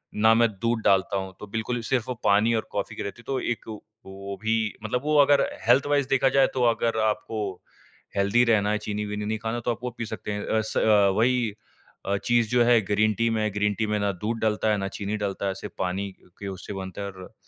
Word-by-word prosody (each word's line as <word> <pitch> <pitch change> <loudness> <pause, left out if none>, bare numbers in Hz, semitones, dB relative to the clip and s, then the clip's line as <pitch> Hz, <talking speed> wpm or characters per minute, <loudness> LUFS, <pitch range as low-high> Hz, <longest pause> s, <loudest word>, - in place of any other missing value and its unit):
ना 110 +1 +5
मैं 115 0 +4
दूध 115 -1 0
डालता 95 +1 +3
हूँ 95 0 -5
तो 105 - -8
बिल्कुल 115 +3 -3
सिर्फ़ 125 -4 +1
वो 125 - -2
पानी 105 +2 +4
और 110 - -2
कॉफ़ी 100 -1 -3
की - - -4
रहती 100 +4 -7
है - - -24
तो 135 -1 -1
एक 120 - -3
व 110 -1 -6 0.3
वो 100 +1 -7
भी 110 0 +2 0.3
मतलब 120 +3 -1
वो 150 0 +1
अगर 140 0 +5 0.3
हेल्थ 125 +3 +5
वाइज़ 145 -2 +2
देखा 135 0 +3
जाए 135 0 +4
तो 130 - -1
अगर 115 -1 +1
आपको 110 +1 -2 0.8
हेल्दी 100 +5 +3
रहना 105 -3 +3
है 105 - +1
चीनी-वीनी 105 0 -4
नहीं 110 +1 -1
खाना 115 +2 -3
तो 120 - +2
आप 115 - -4
वो 125 - -1
पी 115 - -3
सकते 110 -1 -6
हैं 105 0 -3
अ, 110 - +2
स 105 -2 +3
वही 120 -1 +2 0.5
अ, 100 +1 0
चीज़ 120 -2 +2
जो 125 -1 +4
है 120 -1 +6
ग्रीन 105 +2 +1
टी 115 +3 +1
में 110 -1 0
है, 105 - +1
ग्रीन 105 +1 0
टी 110 - +1
में 105 - 0
ना 100 0 +1
दूध 105 +5 -3
डलता 110 0 +1
है, 105 - +2
ना 95 -1 -2
चीनी 100 +2 -4
डलता 100 -1 -2
है 95 - 0
सिर्फ़ - - -8
पानी 95 +2 -2 0.3
के 100 - -6
उससे 95 +1 -6
बनता 95 0 -6
है 100 - -3
और 95 -1 -12
110 Hz, 245 wpm, -25 LUFS, 100-115 Hz, 0.8 s, है